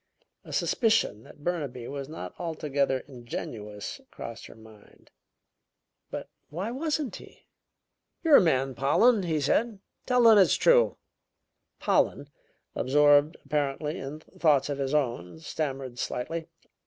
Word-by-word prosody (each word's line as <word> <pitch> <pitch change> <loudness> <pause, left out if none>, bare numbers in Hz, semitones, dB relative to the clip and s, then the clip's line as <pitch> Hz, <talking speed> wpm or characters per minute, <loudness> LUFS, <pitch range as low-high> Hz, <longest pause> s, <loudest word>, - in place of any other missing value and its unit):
A - - -11
suspicion 225 - +1
that 145 - -16
Burnaby 140 -9 -3
was 140 0 -6
not 160 - -7
altogether 145 -6 -1
ingenuous 110 -5 -7
crossed - - -8
her - - -14
mind. 110 -2 -18 1.0
But - - -6 0.2
why 185 +9 -4
wasn't 295 - -2
he? - - -16 0.8
"You're 315 -4 +8
a - - +6
man, 135 -6 +1
Pollen," 200 - +3
he 165 -4 -1
said; 210 - +1 0.3
"tell 250 -1 +3
them 225 -2 +8
it's 190 - +5
true." - - +4 0.8
Pollen, - - +1 0.4
absorbed 145 +3 +4
apparently 150 +2 -1
in 145 +3 -7
thoughts 155 -6 +1
of 140 -1 -3
his 135 +1 -1
own 120 - -1
stammered 135 -5 -4
slightly. 165 +6 -3
150 Hz, 125 wpm, -28 LUFS, 135-180 Hz, 1.0 s, You're